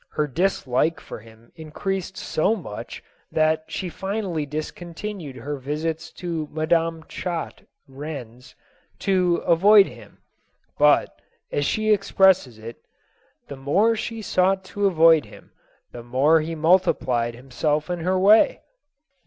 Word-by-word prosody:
Her 150 Hz, -, 0 dB
dislike 155 Hz, -1 st, 0 dB
for -, -, -9 dB
him 115 Hz, +1 st, -18 dB
increased 185 Hz, +4 st, -5 dB
so 195 Hz, +8 st, 0 dB
much 160 Hz, -, -8 dB, 0.3 s
that 155 Hz, 0 st, +1 dB
she 190 Hz, -, -4 dB
finally 190 Hz, -4 st, -3 dB
discontinued 165 Hz, +2 st, -6 dB
her 140 Hz, +4 st, -5 dB
visits 155 Hz, +4 st, -4 dB
to 165 Hz, -4 st, -4 dB
Madame 165 Hz, +1 st, 0 dB
Chat... 170 Hz, +1 st, -6 dB, 0.2 s
Ren. 135 Hz, -4 st, -8 dB
.'s, -, -, -18 dB, 0.4 s
to 185 Hz, -3 st, +1 dB
avoid 195 Hz, +4 st, +6 dB
him: -, -, -13 dB, 0.6 s
but, -, -, +3 dB, 0.3 s
as 145 Hz, -, 0 dB
she 215 Hz, 0 st, +2 dB
expresses 190 Hz, -, +3 dB
it, 115 Hz, +2 st, -9 dB, 0.4 s
" -, -, -41 dB
the 140 Hz, -, -7 dB
more 195 Hz, +12 st, +2 dB
she 225 Hz, 0 st, -5 dB
sought 190 Hz, 0 st, +1 dB
to 200 Hz, +2 st, -1 dB
avoid 165 Hz, -, +5 dB
him, 105 Hz, -, -16 dB, 0.4 s
the 120 Hz, -, -9 dB
more 135 Hz, +7 st, +3 dB
he 165 Hz, +2 st, -4 dB
multiplied 140 Hz, -8 st, +1 dB
himself 145 Hz, +4 st, -2 dB
in 175 Hz, -1 st, -3 dB
her 185 Hz, +3 st, 0 dB
way." 210 Hz, -, +4 dB
160 Hz, 130 wpm, -23 LUFS, 145-190 Hz, 0.6 s, avoid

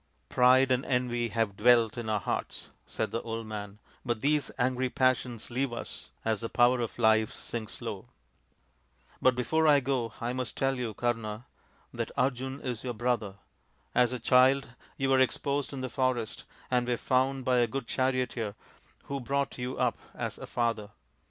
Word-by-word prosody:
" -, -, -42 dB
Pride 130 Hz, +1 st, +5 dB
and 130 Hz, +1 st, +2 dB
envy 125 Hz, -2 st, 0 dB
have 110 Hz, -2 st, -1 dB
dwelt 115 Hz, 0 st, +4 dB
in 120 Hz, -2 st, -4 dB
our 105 Hz, -2 st, +1 dB
hearts/' -, -, -4 dB, 0.2 s
said -, -, -2 dB
the 115 Hz, -, -2 dB
old 115 Hz, 0 st, -4 dB
man, 105 Hz, -2 st, -6 dB
" -, -, -31 dB
but 120 Hz, -3 st, -2 dB
these 150 Hz, 0 st, +2 dB
angry 130 Hz, 0 st, +1 dB
passions 125 Hz, -3 st, 0 dB
leave 130 Hz, +1 st, 0 dB
us 120 Hz, -, -7 dB, 0.2 s
as 110 Hz, -2 st, 0 dB
the 115 Hz, -, -3 dB
power 120 Hz, +1 st, +4 dB
of 115 Hz, -2 st, -3 dB
life 110 Hz, -2 st, +4 dB
sinks 110 Hz, -3 st, -6 dB
low. -, -, -5 dB, 1.1 s
But 130 Hz, -1 st, +4 dB
before 160 Hz, +6 st, +2 dB
I 145 Hz, -2 st, +7 dB
go 125 Hz, -4 st, -1 dB
I 120 Hz, +1 st, -2 dB
must 125 Hz, -1 st, -4 dB
tell 135 Hz, -1 st, +1 dB
you, 115 Hz, -4 st, -3 dB
Kama, 115 Hz, -1 st, -2 dB, 0.5 s
that -, -, -3 dB
Arjun 130 Hz, +1 st, -1 dB
is 125 Hz, -4 st, -4 dB
your 125 Hz, -2 st, -3 dB
brother. 110 Hz, -4 st, -1 dB, 0.6 s
As 125 Hz, -1 st, +4 dB
a 125 Hz, -, -2 dB
child 130 Hz, +3 st, +4 dB, 0.3 s
you 135 Hz, -, 0 dB
were 135 Hz, -, +5 dB
exposed 140 Hz, +2 st, +1 dB
in 135 Hz, -2 st, -5 dB
the 130 Hz, -, -2 dB
forest 130 Hz, -3 st, -1 dB, 0.3 s
and 125 Hz, -1 st, +2 dB
were 120 Hz, -1 st, +1 dB
found 130 Hz, +1 st, +1 dB
by 125 Hz, -1 st, +3 dB
a 120 Hz, -, +3 dB
good 135 Hz, +2 st, -4 dB
charioteer, 125 Hz, -5 st, -1 dB, 0.5 s
who 140 Hz, 0 st, -4 dB
brought 140 Hz, +1 st, -2 dB
you 125 Hz, +1 st, -3 dB
up -, -, +1 dB, 0.2 s
as -, -, -4 dB
a -, -, -7 dB
father. 115 Hz, -4 st, -1 dB
125 Hz, 180 wpm, -29 LUFS, 115-130 Hz, 1.1 s, I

